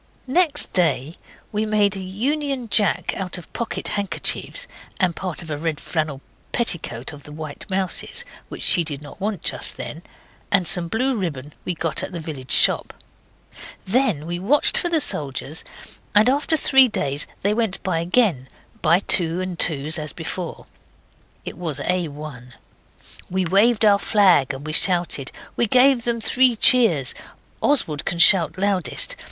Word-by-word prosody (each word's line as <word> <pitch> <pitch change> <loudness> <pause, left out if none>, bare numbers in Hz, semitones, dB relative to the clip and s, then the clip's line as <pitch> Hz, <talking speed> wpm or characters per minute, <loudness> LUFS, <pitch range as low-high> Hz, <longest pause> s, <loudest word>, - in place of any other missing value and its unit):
Next 295 +2 +1
day 160 -3 +1 0.4
we 210 0 -1
made 210 -2 +1
a - - -3
Union 255 +7 -2
Jack 205 -1 +1
out 185 -1 -4
of 175 - -13
pocket 235 - -3
handkerchiefs 205 - -2 0.3
and 180 -3 +1
part 180 -3 -4
of 160 - -9
a 145 - -4
red 160 -2 -3
flannel 155 -4 -3 0.3
petticoat 160 - -2
of 145 - -11
the 150 - -14
White 155 +2 -8
Mouse's, 190 -1 0 0.2
which - - -5
she 175 - +5
did 150 -2 -4
not 150 - -13
want 205 -3 -3
just - - 0
then, 160 - -7 0.5
and 195 -3 +2
some 180 -3 +3
blue 250 +7 -1
ribbon 150 - -5
we 180 - -2
got 165 +1 -1
at 190 - -6
the 170 - -5
village 145 -5 -8
shop. - - +3 0.9
Then 205 - 0
we 175 +1 -4
watched 255 +11 +2
for 350 - +2
the 330 -2 +3
soldiers, 145 - -2 0.5
and 210 +3 +6
after 290 +4 +1
three 265 -3 +5
days 145 - -2 0.2
they 205 +2 +2
went 220 -4 -2
by 180 -4 -1
again, 170 - +1 0.3
by 175 +3 +3
twos 170 -3 +1
and 185 -2 -6
twos 155 +1 +1
as 150 -2 -5
before. 170 +1 -6 0.8
It - - -7
was 160 -6 -3
A1. 150 -8 -4 0.8
We 185 0 -1
waved 210 +5 +3
our 200 -1 +5
flag, 185 - +3
and 135 +2 -8
we 155 - -4
shouted. 175 -7 +2 0.2
We 235 - +1
gave 255 +1 +4
them 235 -1 0
three 250 +2 +2
cheers. 210 - +4 0.5
Oswald 160 - +1
can 170 - -3
shout 170 -2 +6
loudest. 185 -8 0
180 Hz, 160 wpm, -21 LUFS, 155-220 Hz, 0.9 s, and